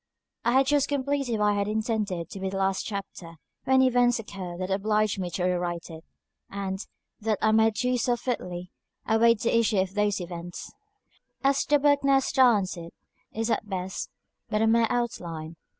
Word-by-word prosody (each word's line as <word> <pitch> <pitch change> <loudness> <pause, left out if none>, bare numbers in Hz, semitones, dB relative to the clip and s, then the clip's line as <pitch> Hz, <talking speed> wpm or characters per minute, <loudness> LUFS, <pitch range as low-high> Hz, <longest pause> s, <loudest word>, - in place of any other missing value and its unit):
I 235 - +2
had 265 +1 +5
just 285 0 +2
completed 280 -4 -1
what 210 0 +3
I - - +1
had 200 0 0
intended 215 -6 -2
to 195 - -7
be 190 0 -2
the 195 - -4
last 195 0 0
chapter, 195 -5 -7 0.3
when 260 0 +4
events 245 -1 +3
occurred 185 -5 -7
that 185 +1 -3
obliged 210 +1 +1
me 180 -2 -2
to 180 +1 -3
rewrite 175 -2 -1
it, 160 0 -10 0.5
and, 195 0 -4 0.4
that 215 -1 0
I 220 - +3
might 220 0 +4
do 250 +1 0
so 240 +1 +1
fitly, 180 -8 -4 0.3
await 225 0 +4
the 235 - +1
issue 225 -2 +2
of 190 0 0
those 205 -1 +1
events. 175 0 -7 0.7
As 275 0 +3
the 295 - +4
book 285 0 +3
now 275 0 +5
stands 240 -8 +3
it 170 0 -9 0.4
is 225 +1 -2
at 210 - -1
best 185 -1 -4 0.4
but 215 +1 +1
a - - +4
mere 225 0 +4
outline. 170 -9 -3
210 Hz, 180 wpm, -27 LUFS, 185-240 Hz, 0.7 s, had